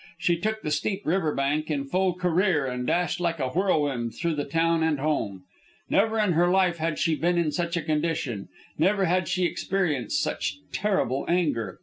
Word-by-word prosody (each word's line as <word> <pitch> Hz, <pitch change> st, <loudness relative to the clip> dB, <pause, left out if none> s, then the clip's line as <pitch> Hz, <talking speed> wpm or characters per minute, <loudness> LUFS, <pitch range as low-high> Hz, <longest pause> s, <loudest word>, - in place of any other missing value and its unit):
She 170 Hz, +1 st, +2 dB
took 215 Hz, +2 st, -2 dB
the 150 Hz, -, -2 dB
steep 190 Hz, +7 st, -1 dB
river 160 Hz, -2 st, +1 dB
bank 145 Hz, +3 st, 0 dB
in 145 Hz, -3 st, -1 dB
full 185 Hz, +4 st, +1 dB
career 180 Hz, -3 st, +1 dB
and 125 Hz, -1 st, -3 dB
dashed 175 Hz, 0 st, 0 dB
like 170 Hz, -1 st, 0 dB
a 130 Hz, -2 st, 0 dB
whirlwind 145 Hz, -, 0 dB
through 170 Hz, 0 st, -1 dB
the 145 Hz, -1 st, -2 dB
town 165 Hz, +2 st, +1 dB
and 160 Hz, -3 st, +1 dB
home. 110 Hz, -11 st, -1 dB, 0.5 s
Never 220 Hz, +2 st, +3 dB
in 210 Hz, -3 st, +2 dB
her 175 Hz, +1 st, +3 dB
life 180 Hz, -2 st, +3 dB
had 160 Hz, -1 st, -1 dB
she 165 Hz, -, +1 dB
been 175 Hz, +3 st, +1 dB
in 165 Hz, -3 st, +1 dB
such 170 Hz, +1 st, -1 dB
a 170 Hz, -, -2 dB
condition; 150 Hz, -9 st, -1 dB, 0.3 s
never 195 Hz, +3 st, +3 dB
had 180 Hz, 0 st, +1 dB
she 180 Hz, -1 st, +1 dB
experienced 175 Hz, -, -1 dB
such -, -, -2 dB
terrible 190 Hz, -, 0 dB
anger. 145 Hz, -, 0 dB
165 Hz, 190 wpm, -26 LUFS, 145-180 Hz, 0.5 s, Never